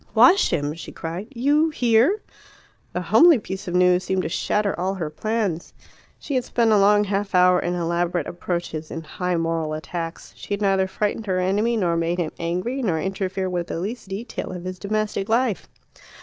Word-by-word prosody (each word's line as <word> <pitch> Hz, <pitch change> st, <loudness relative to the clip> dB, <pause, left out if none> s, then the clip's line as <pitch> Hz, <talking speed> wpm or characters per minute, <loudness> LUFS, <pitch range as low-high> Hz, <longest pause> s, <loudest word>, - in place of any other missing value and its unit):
"Wash 380 Hz, +2 st, +6 dB
him!" 145 Hz, -3 st, -1 dB
she 165 Hz, -, -9 dB
cried. 170 Hz, +6 st, -6 dB
"You? 290 Hz, +5 st, +2 dB
Here?" 255 Hz, -, +2 dB, 0.7 s
The -, -, -3 dB
homely 335 Hz, -3 st, +6 dB
piece 195 Hz, -2 st, -7 dB
of 175 Hz, -, -2 dB
news 180 Hz, 0 st, +4 dB
seemed 190 Hz, -1 st, -1 dB
to -, -, -2 dB
shatter 205 Hz, +4 st, 0 dB
all 190 Hz, +2 st, -1 dB
her 165 Hz, -5 st, -4 dB
plans. 205 Hz, -1 st, -2 dB, 0.4 s
She 285 Hz, -, -6 dB
had 255 Hz, -2 st, +1 dB
spent 230 Hz, -2 st, +1 dB
a 210 Hz, -, +5 dB
long 205 Hz, +1 st, +5 dB
half 200 Hz, -1 st, -2 dB
hour 180 Hz, 0 st, +5 dB
in 175 Hz, +1 st, -2 dB
elaborate 170 Hz, -1 st, -1 dB
approaches, 170 Hz, -3 st, -4 dB
in 165 Hz, -, -6 dB
high 180 Hz, +3 st, -2 dB
moral 165 Hz, -2 st, -1 dB
attacks; 165 Hz, +1 st, -6 dB
she 205 Hz, -, -4 dB
had 200 Hz, -, -10 dB
neither 195 Hz, -1 st, +2 dB
frightened 210 Hz, +3 st, -2 dB
her 185 Hz, -1 st, 0 dB
enemy 205 Hz, +6 st, +1 dB
nor 175 Hz, -5 st, +1 dB
made 165 Hz, +1 st, 0 dB
him 170 Hz, -3 st, -1 dB
angry, 180 Hz, +11 st, -2 dB
nor 180 Hz, -10 st, 0 dB
interfered 190 Hz, +1 st, -2 dB
with 175 Hz, -1 st, -2 dB
the -, -, -4 dB
least 210 Hz, +5 st, -5 dB
detail 195 Hz, +3 st, -5 dB
of 180 Hz, -1 st, -7 dB
his 185 Hz, 0 st, -6 dB
domestic 210 Hz, 0 st, -2 dB
life. 230 Hz, -, +1 dB
190 Hz, 190 wpm, -23 LUFS, 175-215 Hz, 0.7 s, Wash